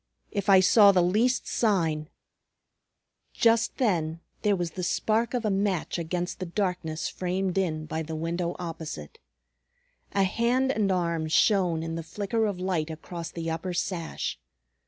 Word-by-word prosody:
If 200 Hz, 0 st, -2 dB
I 190 Hz, -1 st, +8 dB
saw 200 Hz, +2 st, +7 dB
the 180 Hz, -2 st, +3 dB
least 225 Hz, +8 st, +2 dB
sign 165 Hz, -9 st, +1 dB, 0.6 s
" -, -, -51 dB
Just 230 Hz, 0 st, +2 dB
then 165 Hz, -9 st, 0 dB, 0.2 s
there 205 Hz, -2 st, +3 dB
was 175 Hz, -2 st, -2 dB
the 185 Hz, -, -6 dB
spark 220 Hz, +6 st, 0 dB
of 240 Hz, -2 st, -1 dB
a 210 Hz, -, +2 dB
match 195 Hz, -3 st, 0 dB
against 175 Hz, +2 st, -3 dB
the 185 Hz, -, -4 dB
darkness 175 Hz, -4 st, -2 dB
framed 185 Hz, 0 st, -2 dB
in 160 Hz, -5 st, 0 dB
by 160 Hz, 0 st, -3 dB
the 160 Hz, 0 st, -5 dB
window 170 Hz, +2 st, -2 dB
opposite. 160 Hz, -, -7 dB, 0.9 s
A 195 Hz, -, +3 dB
hand 240 Hz, +7 st, +2 dB
and 210 Hz, -6 st, +1 dB
arm 170 Hz, -3 st, 0 dB
shone 175 Hz, -1 st, +3 dB
in 165 Hz, 0 st, -4 dB
the 165 Hz, -, -3 dB
flicker 210 Hz, +6 st, -1 dB
of 200 Hz, -3 st, -3 dB
light 180 Hz, -4 st, -1 dB
across 165 Hz, +1 st, -6 dB
the 165 Hz, -1 st, -4 dB
upper 175 Hz, +3 st, -3 dB
sash. 170 Hz, -2 st, -3 dB
180 Hz, 155 wpm, -27 LUFS, 165-200 Hz, 0.9 s, I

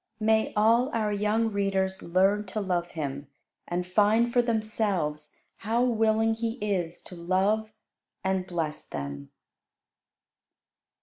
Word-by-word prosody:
May 220 Hz, 0 st, +2 dB
all 230 Hz, +5 st, +4 dB
our 215 Hz, -2 st, 0 dB
young 215 Hz, +2 st, +1 dB
readers 195 Hz, -2 st, 0 dB
learn 195 Hz, +4 st, +2 dB
to 200 Hz, +3 st, -3 dB
love 180 Hz, -4 st, -1 dB
Him, 145 Hz, -4 st, -5 dB, 0.4 s
and 180 Hz, +1 st, -2 dB
find 215 Hz, +5 st, +3 dB
for 245 Hz, -, +5 dB
themselves 210 Hz, -10 st, -1 dB, 0.2 s
how 230 Hz, +3 st, 0 dB
willing 225 Hz, -2 st, +2 dB
He 225 Hz, 0 st, -2 dB
is 195 Hz, -8 st, -3 dB
to 180 Hz, -, -10 dB
love 190 Hz, +5 st, +1 dB, 0.5 s
and 190 Hz, -1 st, 0 dB
bless 160 Hz, -4 st, -3 dB
them. 70 Hz, -1 st, -6 dB
200 Hz, 120 wpm, -27 LUFS, 175-220 Hz, 0.5 s, for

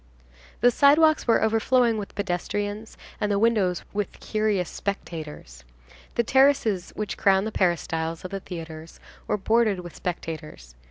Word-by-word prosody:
The 245 Hz, -, +6 dB
sidewalks 305 Hz, +4 st, +4 dB
were 230 Hz, -, +4 dB
overflowing 225 Hz, +1 st, +2 dB
with 200 Hz, -, -8 dB
pedestrians 205 Hz, +3 st, -3 dB, 0.2 s
and 210 Hz, -1 st, 0 dB
the 200 Hz, -, +2 dB
windows 200 Hz, -5 st, +2 dB
with 205 Hz, 0 st, -3 dB
curious 215 Hz, -4 st, 0 dB
spectators. 155 Hz, -, -6 dB, 0.5 s
The 235 Hz, -, +2 dB
terraces 255 Hz, -7 st, +3 dB
which 215 Hz, -1 st, -4 dB
crown 195 Hz, 0 st, +3 dB
the 220 Hz, -, -3 dB
peristyles 165 Hz, -3 st, -1 dB
of 185 Hz, -, -6 dB
the 195 Hz, -, -3 dB
theatres 165 Hz, -3 st, -9 dB, 0.3 s
were 210 Hz, -, +1 dB
bordered 215 Hz, -2 st, +2 dB
with 175 Hz, -1 st, -10 dB
spectators. 155 Hz, -, -6 dB
200 Hz, 140 wpm, -25 LUFS, 175-225 Hz, 0.5 s, The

